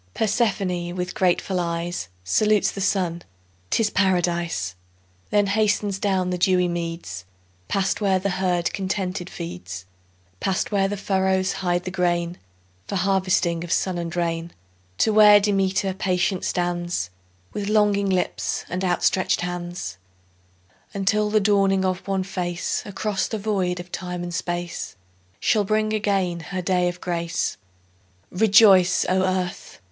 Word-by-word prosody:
Persephone 195 -6 0
with 180 0 -3
grateful 185 -1 +1
eyes 170 - -3
Salutes 210 - +2
the 195 - -6
Sun—'tis 165 - -2
Paradise: 175 - 0 0.6
Then 205 -1 +3
hastens 205 -1 +1
down 190 -3 0
the 180 - -2
dewy 180 0 +3
meads, 165 - -4 0.4
Past 195 +2 0
where 195 -2 +3
the 195 +1 -1
herd 180 -2 0
contented 190 -2 -3
feeds, 90 +1 -7 0.5
Past 190 +2 -1
where 195 -1 +2
the 205 +1 -3
furrows 190 -1 +1
hide 175 -1 -1
the 185 - -5
grain, 175 -1 0 0.5
For - - -3
harvesting 185 -3 +1
of 170 - -6
sun 185 -2 0
and 170 0 -4
rain; 170 -1 -2 0.4
To 220 - +2
where 210 -1 +8
Demeter 195 -1 +1
patient 185 0 0
stands 175 - -1 0.4
With 205 -1 -3
longing 205 -2 +3
lips 185 -1 -1
and 180 +2 -3
outstretched 185 +1 +1
hands, 175 - -5 1.0
Until 210 +2 +1
the 215 0 +3
dawning 195 -2 +3
of 185 +1 -2
one 195 -1 0
face 180 -2 -2
Across 200 0 -1
the 220 - -3
void 195 -4 -1
of 175 0 -9
time 180 -1 -4
and 175 0 -5
space 175 0 -4 0.4
Shall 210 - +2
bring 215 +2 0
again 195 -5 0
her 185 +3 -5
day 180 -1 +2
of 175 0 -7
grace. 170 -8 -2 0.7
Rejoice, 195 -2 +5
O 185 +1 +2
Earth! 185 -1 -2
185 Hz, 135 wpm, -23 LUFS, 175-195 Hz, 1.0 s, where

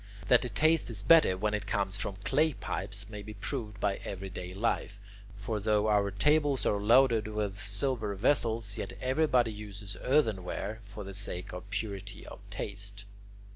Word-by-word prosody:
That 125 -2 +7
the 125 - -3
taste 155 +9 +3
is 105 -3 -4
better 160 - +6
when 105 +2 0
it 105 -1 -2
comes 100 -1 0
from 100 -1 -3
clay 150 +8 +3
pipes 100 -3 -4
may 105 -1 -7
be 105 +1 -9
proved 105 -1 -4
by 100 -1 +1
everyday 95 -2 -6
life, 100 0 -1 0.4
for 105 +2 -3
though 105 0 +2
our 100 -1 +3
tables 145 +6 +2
are 100 -1 +1
loaded 115 0 +5
with 105 -2 -3
silver 105 0 -2
vessels, 115 -2 +1
yet - - -4
everybody 130 -4 +2
uses 100 -1 -8
earthenware 110 -5 0
for 105 0 -9
the 100 0 -8
sake 90 -2 -3
of 90 +2 -8
purity 100 -1 -5
of - - -10
taste. 100 0 -3
105 Hz, 165 wpm, -31 LUFS, 100-115 Hz, 0.4 s, That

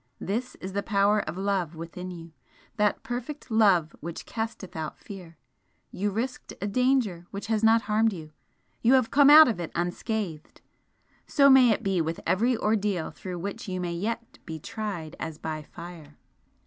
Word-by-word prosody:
This 235 +7 -3
is 190 +1 -8
the 200 - 0
power 205 0 +2
of 170 - -6
love 190 -4 -1
within 170 +3 -7
you 170 -2 -9 0.5
that 210 -1 +1
perfect 250 +3 -6
love 195 -8 +3
which 170 +1 -7
casteth 220 -4 -5
out 160 -1 -5
fear! 180 -5 -11 0.5
You 205 +2 -1
risked 235 +6 -4
a 200 - -3
danger 220 -6 +1
which 200 0 -6
has 220 -1 0
not 225 +1 +5
harmed 220 +2 +2
you 160 -5 -8 0.5
you 235 +3 +4
have 255 -4 +3
come 285 0 +6
out 310 +1 +10
of 225 -7 -1
it 170 - -4
unscathed, 175 -1 -3 0.7
so 280 -2 +5
may 260 -2 +7
it 215 - +1
be 190 -3 +1
with 165 +1 -3
every 235 +5 +2
ordeal 205 -6 0
through 180 -2 -7
which 200 +6 -5
you 185 -1 -3
may 175 -1 -2
yet 225 +6 -4
be 160 -1 -6
tried 175 -4 -5
as 160 -2 -5
by 155 -1 -4
fire!" 155 -1 -11
200 Hz, 175 wpm, -27 LUFS, 170-225 Hz, 0.7 s, out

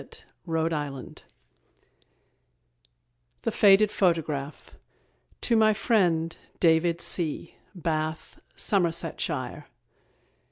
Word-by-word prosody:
_ 155 -5 -3 2.2
THE 230 - 0
FADED 205 0 +5
PHOTOGRAPH. 160 -7 -1 0.7
TO 235 - +2
MY 220 -1 +5
FRIEND, 175 -7 +1 0.2
DAVID 165 0 +3
C, 165 -1 -2 0.2
BATH, 160 -2 -3 0.2
SOMERSETSHIRE. 165 -7 -1
165 Hz, 65 wpm, -27 LUFS, 155-195 Hz, 2.2 s, FADED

